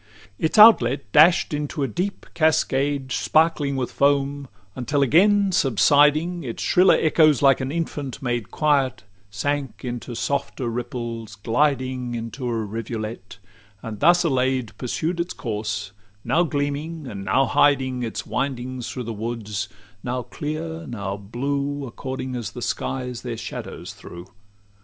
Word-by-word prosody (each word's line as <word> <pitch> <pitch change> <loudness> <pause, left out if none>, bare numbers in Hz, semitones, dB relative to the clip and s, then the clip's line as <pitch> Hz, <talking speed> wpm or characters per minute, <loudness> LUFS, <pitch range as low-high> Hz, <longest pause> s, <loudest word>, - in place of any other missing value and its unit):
LVIII 90 - -24 0.2
Its - - -4
outlet 135 - +6
dash'd 160 - +5
into 150 0 -2
a - - +1
deep 180 - -3
cascade, 145 -4 +1
Sparkling 140 +6 +2
with 130 -2 -2
foam, 140 0 +1 0.3
until 140 +3 0
again 200 - +4
subsiding, 150 - +3
Its 120 -4 -5
shriller 180 +1 +5
echoes 155 -3 +4
like 135 -1 +5
an 130 +1 -3
infant 145 -6 -4
made 120 -4 -2
Quiet 140 -6 +1 0.3
sank 140 +7 -3
into 120 0 -5
softer 140 -1 -2
ripples, 115 -2 -5
gliding 130 +2 0
Into 115 +3 -5
a 115 -2 -1
rivulet; 110 -1 -6 0.5
and 110 -2 -6
thus 175 +3 +5
allay'd, 130 -5 0
Pursued 160 +7 -2
its 170 +1 -2
course, 105 -3 -4 0.3
now 170 - +2
gleaming, 150 0 -2
and 100 -6 -6
now 130 +7 +2
hiding 135 -3 +2
Its 115 -2 -4
windings 130 -2 -3
through 125 - -5
the 115 0 -5
woods; 105 -3 -4 0.3
now 125 0 -2
clear, 160 +6 -5
now 100 -5 -4
blue, 140 +7 -3
According 130 +1 -5
as 120 -3 -5
the 125 - -6
skies 125 -2 -3
their 120 -2 -5
shadows - - -7
threw. 85 +1 -11
130 Hz, 140 wpm, -23 LUFS, 115-145 Hz, 0.5 s, outlet